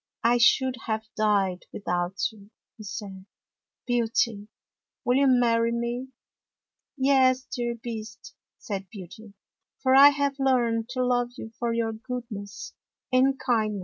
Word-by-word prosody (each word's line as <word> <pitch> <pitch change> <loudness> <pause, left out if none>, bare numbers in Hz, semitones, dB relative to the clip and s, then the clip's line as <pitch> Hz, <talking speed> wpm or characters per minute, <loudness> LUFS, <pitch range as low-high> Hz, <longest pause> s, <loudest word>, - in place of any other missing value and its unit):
" - - -52
I 245 - +2
should 255 +1 +4
have 220 0 -2
died 200 -4 +1
without 180 -1 -2
you," 205 -2 -17 0.3
he 215 - -11
said. 195 -2 -8 0.3
" - - -66
Beauty, 230 -3 0 0.6
will 245 +1 +3
you 275 0 +4
marry 235 -2 +3
me? 235 +2 -3 0.3
" - - -66
" - - -61
Yes, 260 -1 +3
dear 240 -3 -3
Beast," 225 -1 -8 0.2
said 195 -6 -6
Beauty, 200 +2 -11 0.2
" - - -51
for 260 -1 +4
I 280 +1 +10
have 285 -1 -1
learned 240 -4 +1
to 255 0 -1
love 245 -1 0
you 225 - -8
for 235 -1 0
your 230 -1 0
goodness 220 -3 -7 0.4
and 265 +1 +4
kindness." 220 -5 0
235 Hz, 150 wpm, -26 LUFS, 210-255 Hz, 0.6 s, I